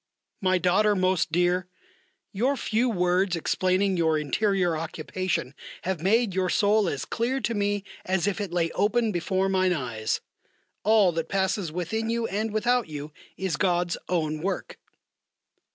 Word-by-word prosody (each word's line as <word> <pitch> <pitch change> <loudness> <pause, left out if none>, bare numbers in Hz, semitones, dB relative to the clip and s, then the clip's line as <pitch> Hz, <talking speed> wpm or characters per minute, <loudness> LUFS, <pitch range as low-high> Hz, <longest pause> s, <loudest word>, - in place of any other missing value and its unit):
MY 185 -1 +3
DAUGHTER 195 +4 +3
MOST 185 -2 +1
DEAR, 175 +1 +1 0.6
Your 255 +7 0
few 235 +2 +1
words 180 -2 +1
explaining 185 +3 +1
your 160 -2 +2
interior 180 +4 +1
occupation 160 -2 -3 0.3
have 185 -3 -2
made 215 +3 +2
your 185 0 0
soul 205 -1 +3
as 135 -2 -3
clear 245 - -1
to 235 - -1
me 205 -1 0 0.2
as 185 -1 0
if 205 +1 -1
it 200 -4 -4
lay 170 -1 0
open 220 +2 +1
before 190 +1 0
mine 185 -1 +2
eyes. 120 -8 -2 0.6
All 210 -3 +5
that 165 -1 -3
passes 190 -3 0
within 200 +7 -2
you 230 0 0
and 215 +1 -2
without 240 +2 +1
you 150 0 -6 0.3
is 185 -5 -2
God's 175 -2 +1
own 155 -3 -1
work. 195 +3 -3
185 Hz, 150 wpm, -26 LUFS, 175-210 Hz, 0.6 s, All